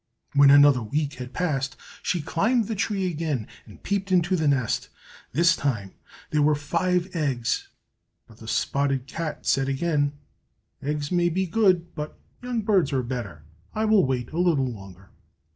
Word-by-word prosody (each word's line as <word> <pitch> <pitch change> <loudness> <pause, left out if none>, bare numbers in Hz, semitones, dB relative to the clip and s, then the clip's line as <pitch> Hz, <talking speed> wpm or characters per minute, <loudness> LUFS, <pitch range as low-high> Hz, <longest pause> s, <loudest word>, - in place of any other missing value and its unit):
When 140 0 +7
another 145 -2 +7
week 145 +6 -2
had 125 0 -6
passed, 135 -6 -2 0.2
she 175 -4 -1
climbed 220 +9 +1
the 225 - -2
tree 200 -1 -1
again 155 -9 -2 0.2
and - - -15
peeped 200 -1 -2
into 180 0 +3
the 160 -3 0
nest. 130 -5 0 0.4
This 170 +6 +4
time 110 -11 -2 0.4
there 150 - +2
were 150 +1 +4
five 180 +5 -1
eggs. 135 -7 -1 0.6
But 110 - -18
the 110 - -12
spotted 135 +2 0
cat 155 +3 -5
said 135 0 +2
again, 145 0 0 0.7
"Eggs 145 0 -3
may 175 -1 +3
be 190 +3 0
good, 185 -3 +2
but 150 -1 -6 0.2
young 245 -3 -2
birds 195 -8 +2
are 130 -2 0
better. 115 - -5 0.3
I 215 +1 +1
will 215 -3 +5
wait 125 -3 -2
a 165 - -3
little 165 -7 +3
longer!" 95 -5 -9
150 Hz, 160 wpm, -25 LUFS, 135-180 Hz, 0.7 s, When